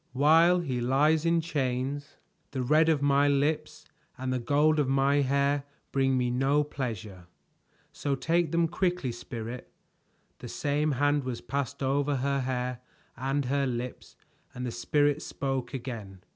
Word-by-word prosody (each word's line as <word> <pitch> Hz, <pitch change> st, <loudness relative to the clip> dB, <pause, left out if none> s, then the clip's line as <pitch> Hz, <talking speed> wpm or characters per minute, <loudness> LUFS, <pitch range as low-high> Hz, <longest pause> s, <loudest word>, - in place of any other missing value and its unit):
"While 165 Hz, +6 st, +5 dB
he 130 Hz, -7 st, -2 dB
lies 150 Hz, +6 st, +3 dB
in 165 Hz, 0 st, +3 dB
chains, 140 Hz, -1 st, -2 dB, 0.3 s
the 130 Hz, -2 st, -3 dB
red 155 Hz, +5 st, +4 dB
of 150 Hz, -3 st, +2 dB
my 140 Hz, 0 st, +4 dB
lips 150 Hz, +2 st, 0 dB, 0.3 s
and 130 Hz, 0 st, -2 dB
the 130 Hz, -, 0 dB
gold 150 Hz, +5 st, +2 dB
of 140 Hz, -3 st, +1 dB
my 135 Hz, +1 st, +3 dB
hair 140 Hz, +1 st, +2 dB, 0.3 s
bring 135 Hz, -1 st, +2 dB
me 125 Hz, -1 st, +1 dB
no 135 Hz, +4 st, +2 dB
pleasure; 110 Hz, -10 st, -6 dB, 0.6 s
so 140 Hz, -1 st, -2 dB
take 165 Hz, +3 st, +1 dB
them 170 Hz, 0 st, +2 dB
quickly, 175 Hz, -5 st, -1 dB
Spirit." 120 Hz, +1 st, -7 dB, 0.7 s
The -, -, -8 dB
same 150 Hz, +1 st, 0 dB
hand 145 Hz, +2 st, +2 dB
was 125 Hz, -2 st, -4 dB
passed 140 Hz, +1 st, -3 dB
over 140 Hz, +2 st, +1 dB
her 140 Hz, +1 st, 0 dB
hair 125 Hz, -1 st, -2 dB, 0.4 s
and 135 Hz, +3 st, -1 dB
her 140 Hz, +2 st, +1 dB
lips 125 Hz, 0 st, -5 dB, 0.4 s
and 125 Hz, +1 st, -4 dB
the 120 Hz, -, -3 dB
Spirit 145 Hz, +5 st, +1 dB
spoke 135 Hz, -3 st, -3 dB
again. 110 Hz, -8 st, -7 dB
140 Hz, 150 wpm, -28 LUFS, 125-145 Hz, 0.7 s, While